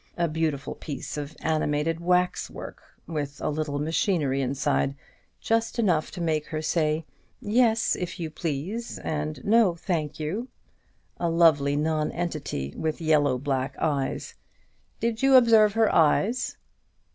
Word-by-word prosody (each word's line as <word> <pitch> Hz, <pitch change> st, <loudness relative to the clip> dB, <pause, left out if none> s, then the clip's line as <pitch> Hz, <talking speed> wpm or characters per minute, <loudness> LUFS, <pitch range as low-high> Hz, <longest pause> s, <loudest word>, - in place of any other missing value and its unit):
A 170 Hz, -1 st, +2 dB
beautiful 155 Hz, -3 st, -2 dB
piece 145 Hz, -4 st, -6 dB
of 150 Hz, 0 st, -6 dB
animated 155 Hz, +1 st, 0 dB
waxwork, 180 Hz, +1 st, -1 dB, 0.2 s
with 145 Hz, -3 st, -4 dB
a -, -, -1 dB
little 150 Hz, -1 st, -2 dB
machinery 150 Hz, -2 st, 0 dB
inside, 135 Hz, +1 st, 0 dB, 0.4 s
just 225 Hz, +1 st, 0 dB
enough 180 Hz, -9 st, +2 dB
to 180 Hz, -, -5 dB
make 155 Hz, -3 st, 0 dB
her 155 Hz, -, -3 dB
say, 155 Hz, 0 st, 0 dB, 0.3 s
'Yes, 230 Hz, -1 st, +2 dB
if 180 Hz, +1 st, -5 dB
you 160 Hz, -2 st, -4 dB
please,' 170 Hz, +10 st, -4 dB
and 150 Hz, -2 st, -4 dB
'No, 215 Hz, -4 st, +4 dB
thank 160 Hz, -4 st, -3 dB
you.' 190 Hz, +11 st, -3 dB, 0.7 s
A 170 Hz, -, 0 dB
lovely 155 Hz, -4 st, +4 dB
non 155 Hz, 0 st, 0 dB
entity 155 Hz, -, -3 dB
with 160 Hz, -1 st, -2 dB
yellow 150 Hz, -5 st, +3 dB
black 135 Hz, 0 st, -2 dB
eyes. 140 Hz, -4 st, -1 dB, 0.7 s
Did 230 Hz, 0 st, -1 dB
you 270 Hz, 0 st, +5 dB
observe 225 Hz, -4 st, +6 dB
her 225 Hz, 0 st, +3 dB
eyes?" 200 Hz, +10 st, +2 dB
160 Hz, 135 wpm, -26 LUFS, 150-185 Hz, 0.7 s, observe